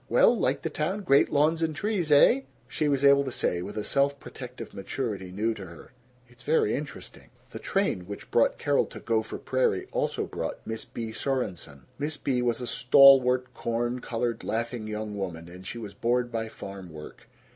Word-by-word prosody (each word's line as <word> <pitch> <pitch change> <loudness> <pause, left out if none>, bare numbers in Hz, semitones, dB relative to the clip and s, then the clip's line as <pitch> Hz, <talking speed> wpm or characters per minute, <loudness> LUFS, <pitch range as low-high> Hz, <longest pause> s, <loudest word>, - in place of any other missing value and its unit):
Well, - - +5
like - - 0
the - - -2
town? 185 +7 -2
Great 140 -7 +4
lawns 155 +3 +2
and 160 -2 0
trees, 190 -3 -1
eh?" 190 - +6 0.3
she 155 - -1
was 140 -1 +2
able 140 0 +6
to 135 - -4
say, 85 -6 -1
with 100 +4 -7
a 105 - -1
self 140 +2 +1
protective 125 -3 -9
maturity 100 -2 -4
new 110 +4 0
to 100 - -9
her, 85 - -13 0.4
"It's 125 0 -18
very 135 -5 +2
interesting." 145 0 -6
III - - -25 0.2
The - - -7
train - - 0
which 100 - -8
brought 115 - +3
Carol 145 -1 +1
to - - -10
Gopher 110 -1 -1
Prairie 130 -7 0
also - - -1
brought - - -5
Miss 110 0 -5
Bea 115 -1 -6
Sorenson. 90 - -3 0.2
Miss 150 +1 -2
Bea 130 -4 0
was 120 0 0
a - - -3
stalwart, 130 0 +5
corn 120 +2 -2
colored, 115 -1 -2
laughing 115 0 -3
young 105 -1 -4
woman, 85 -4 -5
and 90 +2 -11
she 120 - -5
was 105 -4 -7
bored 120 +1 0
by 115 -1 -2
farm 95 -4 -9
work. 75 -1 -11
120 Hz, 190 wpm, -27 LUFS, 105-140 Hz, 0.4 s, eh